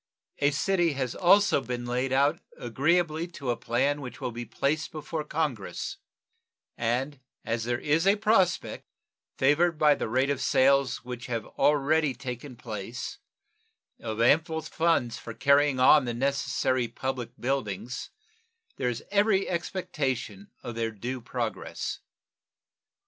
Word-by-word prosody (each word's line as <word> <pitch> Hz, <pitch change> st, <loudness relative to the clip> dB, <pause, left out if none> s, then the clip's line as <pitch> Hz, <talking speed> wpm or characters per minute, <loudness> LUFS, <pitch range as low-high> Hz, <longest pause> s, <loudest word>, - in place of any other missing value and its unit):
A 145 Hz, -, +4 dB
city 170 Hz, +2 st, +1 dB
has 130 Hz, -3 st, -2 dB
also 195 Hz, -3 st, +4 dB
been 125 Hz, -1 st, -4 dB
laid 125 Hz, +2 st, -1 dB
out 140 Hz, +2 st, +3 dB, 0.2 s
agreeably 155 Hz, +6 st, +1 dB
to 130 Hz, -3 st, -2 dB
a -, -, 0 dB
plan 135 Hz, +6 st, 0 dB
which 125 Hz, -2 st, -8 dB
will 125 Hz, -, -3 dB
be 120 Hz, +1 st, -6 dB
placed 155 Hz, +6 st, -1 dB
before 155 Hz, 0 st, -4 dB
Congress, 150 Hz, -9 st, -3 dB, 0.8 s
and 125 Hz, +5 st, -1 dB, 0.3 s
as 115 Hz, 0 st, -1 dB
there 120 Hz, 0 st, 0 dB
is 155 Hz, +7 st, +1 dB
a 200 Hz, -, +6 dB
prospect, 205 Hz, -4 st, +1 dB, 0.5 s
favored 155 Hz, +5 st, +3 dB
by 150 Hz, -1 st, +5 dB
the -, -, -3 dB
rate 130 Hz, +4 st, +2 dB
of 140 Hz, -2 st, -2 dB
sales 135 Hz, -2 st, +3 dB
which 125 Hz, 0 st, -6 dB
have 115 Hz, -3 st, -3 dB
already 150 Hz, -1 st, +2 dB
taken 125 Hz, +1 st, -7 dB
place, 115 Hz, 0 st, -6 dB, 0.8 s
of 110 Hz, -1 st, -5 dB
ample 160 Hz, +6 st, +3 dB
funds 160 Hz, -7 st, 0 dB
for 115 Hz, -, -8 dB
carrying 140 Hz, -1 st, +3 dB
on 130 Hz, +2 st, +6 dB
the 120 Hz, -1 st, -3 dB
necessary 130 Hz, -1 st, 0 dB
public 125 Hz, -1 st, -5 dB
buildings, 120 Hz, -2 st, -3 dB, 0.7 s
there 125 Hz, -, 0 dB
is 120 Hz, -1 st, -4 dB
every 200 Hz, -1 st, +3 dB
expectation 135 Hz, -, -3 dB
of 120 Hz, -, -5 dB
their 115 Hz, 0 st, -1 dB
due 120 Hz, +4 st, -5 dB
progress. 115 Hz, -2 st, -4 dB
135 Hz, 135 wpm, -28 LUFS, 120-155 Hz, 0.8 s, a